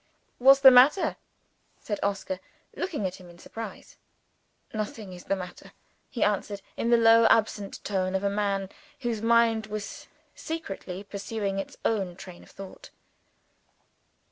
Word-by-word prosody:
"What's 270 +2 +7
the 265 -1 +10
matter?" 265 +9 +5 0.6
said 205 - -4
Oscar, 195 -2 -2 0.4
looking 310 - -3
at 185 0 -3
him 180 -2 -14
in 175 - -15
surprise. 225 +5 -9 0.8
"Nothing 215 -2 -5
is 180 - -11
the 195 - 0
matter," 180 -2 -9 0.4
he 240 - -1
answered, 205 -1 -1
in 230 - -1
the 235 - +6
low 230 0 +6
absent 210 -3 +1
tone 190 -2 -1
of 190 - -1
a - - +2
man 200 -2 -1 0.3
whose 235 -4 -2
mind 230 -1 +3
was 215 -1 -6 0.3
secretly 195 - -6
pursuing 200 0 -4
its 195 - -6
own 195 -6 0
train 180 -1 -11
of - - -17
thought. 195 -1 -11
205 Hz, 140 wpm, -27 LUFS, 195-230 Hz, 0.8 s, the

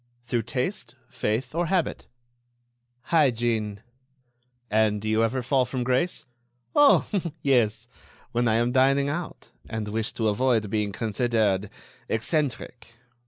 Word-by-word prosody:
"Through 120 -1 0
taste, - - -3
faith, 115 +6 -2
or 170 +1 0
habit?" 185 -2 -1 1.1
"Hygiene." 115 -8 +2 0.9
"And 105 -1 +2
do 110 - -6
you 110 0 +2
never 115 +3 +1
fall 130 +1 +2
from 125 0 -3
grace?" 130 +6 0 0.5
"Oh! 290 -1 +6 0.4
yes... 120 -4 +2 0.4
when 120 0 +1
I 110 - +3
am 120 +2 +2
dining 135 +2 +3
out... 170 +3 -6 0.2
and 110 -1 -4
wish 110 +1 -2
to 110 - -1
avoid 110 -1 +1
being 105 -2 0
considered 110 -2 0 0.4
eccentric." 120 -1 -2
120 Hz, 120 wpm, -25 LUFS, 110-130 Hz, 1.1 s, Oh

